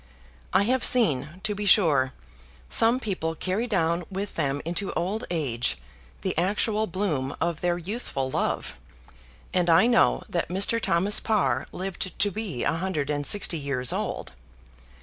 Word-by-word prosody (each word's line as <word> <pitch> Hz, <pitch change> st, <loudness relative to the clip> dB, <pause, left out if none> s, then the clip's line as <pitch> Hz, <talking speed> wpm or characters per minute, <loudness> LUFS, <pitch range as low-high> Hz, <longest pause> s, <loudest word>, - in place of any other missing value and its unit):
I -, -, +4 dB
have 255 Hz, +3 st, +1 dB
seen, 160 Hz, -, +3 dB
to 215 Hz, -1 st, 0 dB
be 205 Hz, 0 st, -4 dB
sure, 150 Hz, -10 st, +4 dB, 0.6 s
some 230 Hz, +3 st, +4 dB
people 180 Hz, -8 st, -3 dB
carry 190 Hz, +8 st, -2 dB
down 170 Hz, -5 st, 0 dB
with 200 Hz, +1 st, -4 dB
them 145 Hz, -3 st, -1 dB
into 175 Hz, +4 st, -1 dB
old 200 Hz, +6 st, -2 dB
age 135 Hz, -9 st, -1 dB, 0.5 s
the -, -, -1 dB
actual 210 Hz, +4 st, +1 dB
bloom 160 Hz, -8 st, -2 dB
of 165 Hz, -1 st, -2 dB
their 175 Hz, -1 st, +1 dB
youthful 175 Hz, -, -4 dB
love, -, -, -2 dB, 0.7 s
and 180 Hz, -1 st, +2 dB
I 165 Hz, +6 st, +6 dB
know 240 Hz, -1 st, +3 dB
that 170 Hz, -, -2 dB
Mr. 200 Hz, +5 st, +1 dB
Thomas 190 Hz, +4 st, +2 dB
Parr 135 Hz, -, 0 dB
lived 185 Hz, 0 st, -4 dB
to 205 Hz, -, +2 dB
be 195 Hz, -, -4 dB
a -, -, +1 dB
hundred 165 Hz, -4 st, -2 dB
and 145 Hz, -1 st, 0 dB
sixty 180 Hz, -5 st, +3 dB
years 135 Hz, -3 st, -1 dB
old. -, -, -4 dB
180 Hz, 150 wpm, -26 LUFS, 150-205 Hz, 0.7 s, I